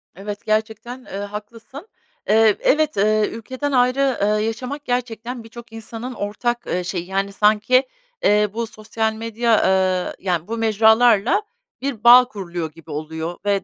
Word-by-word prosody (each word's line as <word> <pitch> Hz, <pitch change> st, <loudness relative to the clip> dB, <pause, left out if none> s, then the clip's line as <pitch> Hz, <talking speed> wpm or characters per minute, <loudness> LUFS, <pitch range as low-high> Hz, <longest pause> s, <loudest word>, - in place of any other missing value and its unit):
Evet, 205 Hz, +2 st, -7 dB
gerçekten, 220 Hz, +4 st, -2 dB
eee, 195 Hz, -, -7 dB
haklısın. 215 Hz, -, -8 dB, 0.4 s
Eee, 220 Hz, -1 st, +5 dB
evet, 305 Hz, -5 st, +1 dB
eee, 215 Hz, +1 st, +2 dB
ülkeden 260 Hz, +5 st, -5 dB
ayrı, 255 Hz, +1 st, +2 dB
eee, 210 Hz, +1 st, +1 dB
yaşamak 255 Hz, +6 st, -5 dB
gerçekten 245 Hz, -1 st, -3 dB
birçok 230 Hz, 0 st, -12 dB
insanın 225 Hz, +3 st, -7 dB
ortak, 240 Hz, +3 st, -3 dB
eee, 180 Hz, 0 st, -1 dB
şeyi, 175 Hz, -1 st, -4 dB
yani, 195 Hz, +1 st, -2 dB
sanki, 215 Hz, +6 st, +3 dB, 0.4 s
eee, 210 Hz, 0 st, +3 dB
bu 230 Hz, 0 st, -3 dB
sosyal 220 Hz, +1 st, -3 dB
medya, 230 Hz, 0 st, 0 dB
eee, 185 Hz, -1 st, +1 dB
yani, 175 Hz, -1 st, -1 dB
bu 230 Hz, +1 st, -4 dB
mecralarla 220 Hz, -, +4 dB, 0.4 s
bir 255 Hz, -5 st, -4 dB
bağ 250 Hz, +1 st, +9 dB
kuruluyor 175 Hz, -7 st, -5 dB
gibi 165 Hz, 0 st, -14 dB
oluyor 160 Hz, +3 st, -5 dB
ve 200 Hz, -2 st, +1 dB
220 Hz, 145 wpm, -21 LUFS, 200-240 Hz, 0.4 s, bağ